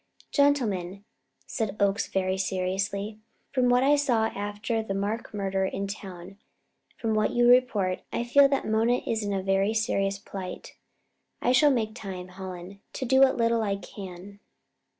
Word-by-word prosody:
"Gentlemen," 205 - +1 0.4
said 215 -4 -3
Oakes 200 +1 +1
very 190 -1 0
seriously, 195 +3 -2 0.3
"from 255 -2 +2
what 245 +1 +4
I 285 +2 +5
saw 245 -6 +2
after 205 +3 -3
the 195 -3 -4
Mark 210 +4 -3
murder 195 -2 -1
in 195 +1 -2
town 195 -3 -7
and 195 +2 -13 0.6
from 225 -1 -1
what 215 0 +1
you 240 0 +4
report, 230 -7 +3
I - - -1
feel 275 +3 +5
that 275 - 0
Mona 225 +3 +2
is 225 -1 -1
in 205 - -2
a 195 -1 -1
very 195 +3 +1
serious 200 -3 0
plight. 190 -2 -8 0.6
I 245 - +1
shall 275 +4 +5
make 225 -5 0
time, 190 -5 -7
Hallen, 185 +1 -9
to 260 - -4
do 265 +2 +3
what 270 -1 +5
little 230 -1 +2
I 200 -2 0
can." 195 0 -10
205 Hz, 165 wpm, -27 LUFS, 195-235 Hz, 0.6 s, I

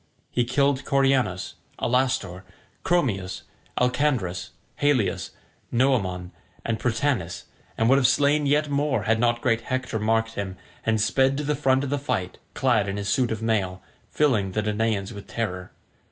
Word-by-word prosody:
He 120 - +1
killed 140 +2 +1
Coeranus, 135 -9 +1 0.2
Alastor, 125 -8 0 0.4
Chromius, 105 - 0 0.4
Alcandrus, 125 -9 0 0.3
Halius, 145 -7 +1 0.4
Noemon, 100 -9 +1 0.3
and 115 -2 -1
Prytanis, 120 - -1 0.3
and 115 - +2
would 135 +3 +5
have 125 - +4
slain 145 +2 +3
yet 150 +2 +2
more, 140 -5 0
had 110 +2 +2
not 120 0 +2
great 115 -2 +1
Hector 130 -2 -2
marked 115 +1 +1
him, 95 -3 -4 0.3
and 110 -1 +1
sped 135 +5 +2
to 150 - -2
the 150 +1 0
front 135 -1 +2
of 140 - -3
the 145 - 0
fight 120 -10 -3 0.2
clad 110 -6 +2
in 100 - -3
his 100 -1 -3
suit 125 +3 +2
of 110 0 -3
mail, 95 -5 -1 0.3
filling 110 -11 +1
the 105 - 0
Danaans 105 -1 -1
with 100 -1 -10
terror. 95 -5 -4
120 Hz, 155 wpm, -25 LUFS, 100-135 Hz, 0.4 s, would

